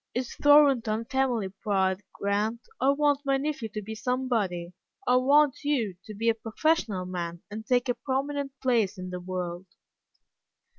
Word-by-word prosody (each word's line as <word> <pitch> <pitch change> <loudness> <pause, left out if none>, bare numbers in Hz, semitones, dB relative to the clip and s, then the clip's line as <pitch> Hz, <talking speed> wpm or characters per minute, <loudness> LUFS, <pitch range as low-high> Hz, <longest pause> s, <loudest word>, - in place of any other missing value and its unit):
"It's 250 0 -2
Thornton 270 -7 +4
family 250 -6 0
pride, 190 -1 0
Grant. 210 +3 -1 0.2
I 270 - +4
want 290 0 +3
my 275 -1 +2
nephew 275 -5 -3
to 215 -1 -6
be 220 +2 -6
somebody. 220 -8 -1 0.3
I 250 +1 +4
want 285 +2 +4
you 245 -10 0
to 215 - -8
be 225 +3 -2
a 230 - +5
professional 225 - 0
man, 175 -2 -5
and 220 +1 -7
take 250 0 +2
a 245 - +2
prominent 275 +1 -3
place 230 -6 +2
in 185 0 -6
the 180 - -4
world." 180 0 -5
230 Hz, 155 wpm, -27 LUFS, 195-270 Hz, 0.3 s, a